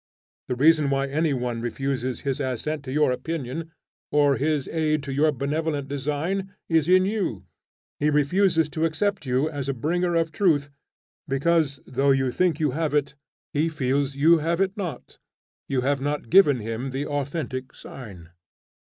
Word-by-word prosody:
The 125 - -1
reason 150 +2 +4
why 135 0 +1
any 150 +3 0
one 125 -3 -2
refuses 130 +1 -2
his 135 -1 -2
assent 140 +3 -3
to 130 - -5
your 150 -1 +3
opinion, 155 +3 -4 0.4
or 145 -2 +4
his 150 -1 0
aid 155 -2 0
to 140 -1 -4
your 150 +3 +3
benevolent 145 +1 -2
design, 150 +8 -2
is 165 -1 +2
in 185 0 +5
you: 190 - -2 0.5
he 150 - +2
refuses 160 +3 +3
to 160 +2 -1
accept 195 0 -1
you 130 +4 +2
as 145 -3 -4
a 135 - -1
bringer 175 +7 0
of 165 -1 +1
truth, 155 -6 +1 0.6
because, 145 0 +1
though 135 +2 +1
you 135 -2 +3
think 175 +1 +1
you 150 -3 +1
have 150 +1 -1
it, 140 -1 +1 0.4
he 155 +2 +1
feels 140 -2 0
that - - -14
you 160 +4 +5
have 165 +3 0
it 195 +1 +1
not. 175 - -6 0.5
You 130 -2 +1
have 140 +1 0
not 145 +1 -3
given 150 - +6
him 115 +4 -4
the 135 +2 -3
authentic 140 -2 -4
sign. 95 -10 -11
145 Hz, 170 wpm, -25 LUFS, 135-160 Hz, 0.6 s, given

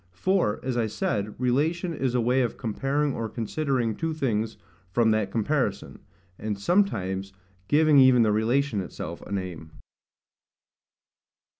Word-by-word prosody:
For, 180 - +1
as 130 -2 -2
I 115 -2 +1
said, 105 0 -2
relation 155 +8 0
is 130 -4 -1
a 125 - +3
way 125 +3 +2
of 120 -3 -1
comparing 135 +5 -1
or 115 -1 -3
considering 120 0 -1
two 165 -1 -2
things 115 -6 -1
[*dropped - - -32
line] 95 +2 -32
from 115 0 +3
that 110 -2 +1
comparison; 115 0 -1 0.4
and 105 -1 -3
sometimes 95 - 0 0.3
giving 150 -1 +5
even 130 -2 +6
the 110 - +3
relation 115 +1 +1
itself 90 - -7
a - - -11
name. 90 -5 -5
120 Hz, 145 wpm, -26 LUFS, 105-140 Hz, 0.4 s, even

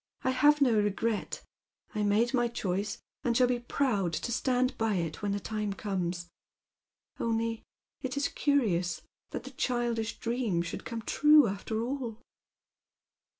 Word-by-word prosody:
I 260 - +2
have 295 +3 +4
no 240 -6 +5
regret. 205 +2 -1 0.5
I 215 - -1
made 210 +4 +2
my 240 -2 +3
choice, 205 -3 -2 0.3
and 235 -1 +2
shall 255 - +6
be 245 -1 +1
proud 235 -8 0
to 235 - -2
stand 255 +1 +1
by 225 -3 +1
it 165 -3 -2
when 205 -1 -1
the 200 - 0
time 210 0 -2
comes. 180 -4 -3 0.9
Only 230 0 0 0.4
it 260 0 -3
is 280 - +2
curious 185 - +1 0.3
that - - -5
the 265 - -9
childish 240 -3 -1
dream 230 -8 0
should 170 - -6
come 230 -2 -5
trae 300 +6 +6
aftei* 215 +1 -2
all." 245 -4 -4
230 Hz, 150 wpm, -30 LUFS, 205-250 Hz, 0.9 s, shall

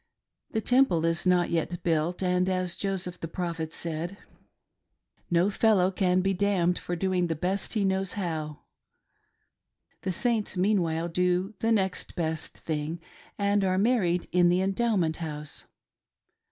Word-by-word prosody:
The 220 - -1
Temple 230 -10 +3
is 165 +2 0
not 180 -1 +3
yet 170 +1 -1
built, 165 +2 0
and 180 0 +2
as 185 -1 0
Joseph, 185 -3 -3
the 165 - -4
Prophet 165 -2 -4
said, 170 +4 -4 0.6
" - - -53 0.3
No 175 +4 +3
fellow 195 -3 +3
c^n 185 -1 +2
be 195 0 +2
damned 185 -2 +1
for 175 - -3
doing 180 0 0
the 165 - -1
best 185 +5 -2
he 210 -3 +1
knows 190 -1 0
how," 160 -6 -4 1.4
the 185 - -2
Saints 220 +1 -1
meanwhile 175 -4 +1
do 180 +3 0
"the 225 - +1
next 190 -4 0
best 160 -2 -3
thing," 155 +1 -3 0.4
and 200 0 +2
are 185 -1 +1
married 195 -5 +2
in 175 -1 +4
the 180 +2 +2
Endowment 195 -5 +1
House. 150 -3 -6
180 Hz, 145 wpm, -28 LUFS, 170-195 Hz, 1.4 s, in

